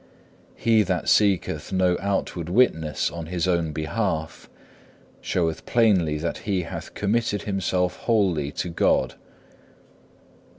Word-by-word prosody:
4. - - -21
He 115 -2 +5
that 90 -4 -1
seeketh 95 -7 +2
no 90 -2 +2
outward 95 -3 -2
witness 80 - +2
on 85 -2 -6
his 90 0 -1
own 85 -3 +1
behalf, 80 +1 -3 0.7
showeth 80 -3 -1
plainly 95 -10 +3
that 85 +2 -3
he 95 -4 -1
hath 85 - -8
committed 105 0 0
himself 90 -2 -1
wholly 95 -11 +1
to 90 - -3
God. 85 - +1
90 Hz, 120 wpm, -24 LUFS, 80-100 Hz, 0.7 s, He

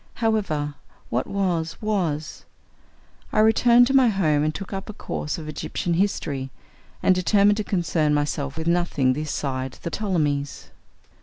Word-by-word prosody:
However, 195 -11 0 0.4
what 125 +2 0
was, 175 -5 -1
was! 175 -8 -2 0.9
I - - -3
returned 235 +3 +6
to 270 - -1
my 260 -2 +6
home 160 -9 +2
and 155 - +1
took 195 0 -6
up 195 +2 -5
a - - -5
course 150 -6 -4
of 160 -2 -7
Egyptian 155 +3 -3
history, 160 -8 -1 0.5
and 185 - +5
determined 200 +3 +3
to 215 - -1
concern 170 -6 0
myself 145 -1 -1
with 160 - -3
nothing 170 -6 +2
this 150 +3 -4
side 130 -2 -3
the 170 - -3
Ptolemies. 150 -9 -2
170 Hz, 150 wpm, -24 LUFS, 150-200 Hz, 0.9 s, returned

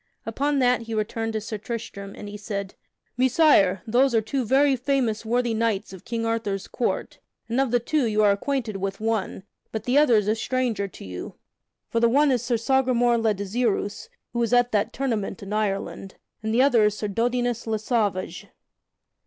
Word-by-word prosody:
Upon 280 +6 0
that 250 -2 +3
he 225 -1 -5
returned 225 +1 -2
to 220 - -2
Sir 215 0 -5
Tristram, 200 -3 -6
and 205 - -8
said: 200 -2 -4 0.4
"Messire, 255 - +4
those 245 +3 +3
are - - +5
two 255 +5 -2
very 270 +4 +3
famous 250 -4 0
worthy 240 +1 0
knights 220 -3 -1
of 190 - -12
King 230 -1 -2
Arthur's 215 -4 -2
Court, 240 - -2 0.3
and 240 +3 +1
of 270 - +1
the 245 +1 +2
two 275 +2 0
you 215 -1 +2
are 205 - +6
acquainted 225 0 -2
with 195 0 -4
one, 220 -4 -2 0.3
but 220 -1 -4
the 255 +5 +3
other 285 -6 +5
is 210 -2 +2
a 215 - +3
stranger 225 -3 -1
to 190 - -12
you. 90 -1 -7 0.5
For 230 - 0
the 235 0 +4
one 285 +3 +4
is 250 -3 +1
Sir 240 -1 0
Sagramore 245 -1 +2
le 220 -2 +1
Desirous, 205 +1 -2 0.2
who 235 - -1
was 235 0 0
at 245 0 +4
that 215 +2 +1
tournament 225 -8 -3
in 195 +1 -6
Ireland, 195 -2 -2 0.3
and 220 0 -2
the 240 +3 +4
other 240 -6 +4
is 210 0 +1
Sir 210 - -2
Dodinas 240 +2 -1
le 220 -1 0
Sauvage." 210 -4 -1
225 Hz, 190 wpm, -24 LUFS, 210-245 Hz, 0.5 s, are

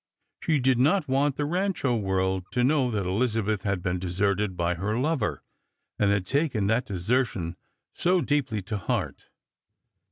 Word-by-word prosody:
She 155 - +2
did 130 -1 +2
not 155 +5 +3
want 135 +1 +1
the 145 - -1
Rancho 175 -6 0
world 95 -3 0
to 125 - +2
kno\f 130 -2 +2
that 100 -3 -1
Elizabeth 110 +1 0
had 95 -3 -2
been 90 0 -1
deserted 95 +2 0
by 85 0 +1
her 100 +6 -2
lover, 140 -3 -1 0.6
and 105 - +3
had 100 -2 +1
taken 140 - 0
that 110 +4 +1
desertion 95 -2 -1 0.4
so 180 +1 +2
deeply 135 - 0
to 105 +3 -3
heart. - - -3
110 Hz, 155 wpm, -26 LUFS, 95-135 Hz, 0.6 s, not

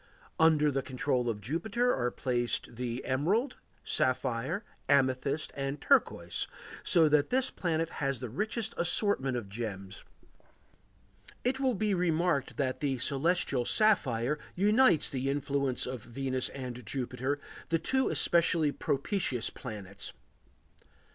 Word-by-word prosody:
Under 155 -2 +5
the 135 0 0
control 125 -1 -1
of 105 -2 -3
Jupiter 220 - 0
are 125 -1 0
placed 120 -1 -1
the 120 0 -4
emerald, 190 - 0 0.3
sapphire, 130 - 0 0.2
amethyst, 140 +1 +1
and 135 +1 -3
turquoise, - - +2 0.3
so 165 -2 +5
that 150 -1 +3
this 260 0 +2
planet 165 -2 -1
has 135 -2 0
the 125 - -4
richest 220 - -2
assortment 170 - +2
of 115 -5 -5
gems; 100 -2 -6 1.4
it 260 +2 0
will 260 -3 +1
be 210 0 0
remarked 170 -5 0
that 130 -2 -1
the 135 -3 -1
celestial 140 0 +1
sapphire 145 - +2 0.2
unites 210 - +4
the 135 0 -2
influence 140 -2 0
of 125 -2 -5
Venus 130 +1 -2
and 125 -2 -7
Jupiter, 130 +4 -3 0.3
the 165 - +3
two 265 +10 +1
especially 165 -3 +2
propitious 140 - -1
planets. 100 -5 -6
140 Hz, 120 wpm, -30 LUFS, 125-170 Hz, 1.4 s, Under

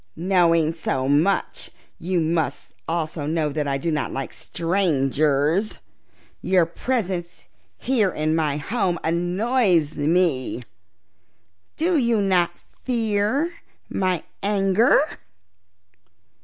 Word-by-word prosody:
"Knowing 170 -3 +2
so 135 -5 -2
much, 155 +8 +1 0.3
you 180 +1 -1
must 160 0 -1
also 160 -2 -2
know 155 -1 0
that 150 0 -2
I 135 -1 0
do 165 +4 -2
not 150 -2 -1
like 135 -1 -5
strangers. 155 0 0 0.6
Your 185 -2 +3
presence 180 -2 -3 0.3
here 235 -7 +1
in 155 -2 -1
my 155 -3 0
home 185 +2 -1
annoys 175 - +1
me. 150 -5 +1 1.1
Do 335 +1 +2
you 235 -3 +2
not 185 -3 +2 0.3
fear 235 +6 0 0.4
my 185 -3 0 0.2
anger?" 200 +4 +3
175 Hz, 100 wpm, -23 LUFS, 155-200 Hz, 1.1 s, Your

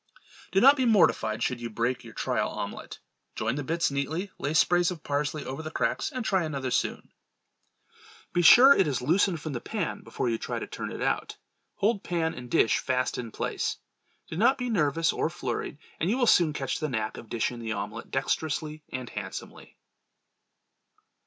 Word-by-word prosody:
Do 195 - +4
not 275 +6 +7
be 260 - +2
mortified 115 - +3
should 125 -2 -1
you 120 - -4
break 120 +3 -1
your 115 -2 -12
trial - - 0
omelette. - - -6 0.4
Join 115 +1 -1
the 145 +2 -3
bits 165 +2 0
neatly; 155 +8 -2
lay 145 +2 -2
sprays 175 +1 +4
of 175 -4 -7
parsley 145 +1 -2
over 135 +4 -5
the 155 - -5
cracks 125 - -1
and 255 -4 -4
try 190 -4 +2
another 140 -5 -3
soon. - - -1 1.2
Be 175 - +3
sure 245 +11 +9
it 190 - +3
is 130 -4 -1
loosened 175 +4 +2
from 155 -1 -5
the 120 - -4
pan - - -3
before - - -3
you 115 -1 0
try - - -4
to - - -4
turn - - -6
it - - -4
out; - - -1 0.4
hold 205 0 +1
pan 165 -2 -1
and 125 0 -9
dish 115 - +3
fast 130 -1 -1
in 120 -2 -5
place; - - -2 0.5
do - - -7
not 240 +7 +4
be 250 -2 -3
nervous 165 -4 +2
or - - 0
flurried, 130 -5 -4 0.2
and 165 - 0
you 230 - +1
will 250 - +3
soon 170 -8 +5
catch 140 -2 -3
the 155 - -2
knack 110 -4 -2
of 115 - -10
dishing 120 +1 -2
the 115 -2 -3
omelette 100 - -5
dexterously 155 0 -2
and 130 -1 -5
handsomely. - - -8
155 Hz, 190 wpm, -27 LUFS, 125-175 Hz, 1.2 s, sure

